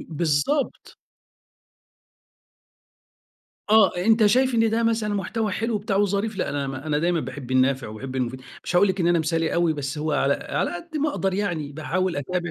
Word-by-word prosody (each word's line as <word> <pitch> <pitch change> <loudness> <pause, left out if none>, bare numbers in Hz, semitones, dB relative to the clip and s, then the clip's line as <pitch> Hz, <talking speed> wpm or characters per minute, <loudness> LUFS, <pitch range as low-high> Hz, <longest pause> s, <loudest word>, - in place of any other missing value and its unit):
بالضبط. 165 - -1 2.7
آه، 215 -3 +6
أنت 220 +4 +4
شايف 255 +3 +3
إن 225 -1 +3
ده 230 +1 +1
مثلًا 220 -2 0
محتوى 210 +1 -2
حلو 225 +3 -1
وبتاع 200 -1 -1
وظريف 205 +1 0
لأ - - -1
أنا 140 -1 -2
م 135 - -4
أنا 150 +2 -2
دايمًا 170 0 +1
باحب 135 -4 -7
النافع 130 0 +2
وباحب 130 +5 -7
المفيد، 130 0 -2 0.2
مش 175 - -1
هاقول 200 +3 +5
لك 190 0 -1
إن 170 - +2
أنا 175 -1 +3
مثالي 165 0 0
أوي، 170 -2 +2
بس 145 0 -4
هو 155 0 -1
على 140 -1 +2
على - - -2
قد 330 -2 -7
ما 300 +1 +1
أقدر 195 -9 -1
يعني 165 -8 -2
باحاول 175 +3 -2
أتابع 175 +5 -3
175 Hz, 180 wpm, -24 LUFS, 145-215 Hz, 2.7 s, آه